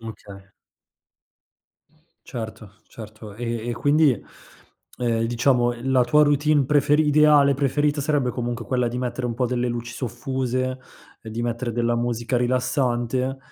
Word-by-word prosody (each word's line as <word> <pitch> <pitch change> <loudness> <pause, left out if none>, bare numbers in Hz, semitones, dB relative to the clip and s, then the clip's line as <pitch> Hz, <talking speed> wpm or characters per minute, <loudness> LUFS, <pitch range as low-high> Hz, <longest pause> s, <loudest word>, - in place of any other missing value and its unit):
Okay. 100 -3 -11 1.8
Certo, 110 -3 -8
certo. 110 -2 -11
E 115 0 -4
e - - -1
quindi, 145 -2 +2 0.8
ehm, 115 -2 0
diciamo 120 +1 +2 0.2
la 130 -2 +4
tua 150 +5 +4
routine 145 0 +3
preferi 150 +2 +3
ideale 150 -2 +5
preferita, 145 +2 0
sarebbe 140 -3 0
comunque 120 -1 -4
quella 125 +2 0
di 120 +1 -3
mettere 125 0 -3
un 115 - -3
po' 125 - 0
delle 125 0 -1
luci 120 0 -4
soffuse, 130 +1 -3 0.4
ehm, 110 - -9
di 120 +1 -3
mettere 120 0 -2
della 120 0 0
musica 120 +1 -1
rilassante, 125 +1 0
125 Hz, 135 wpm, -23 LUFS, 115-135 Hz, 1.8 s, ideale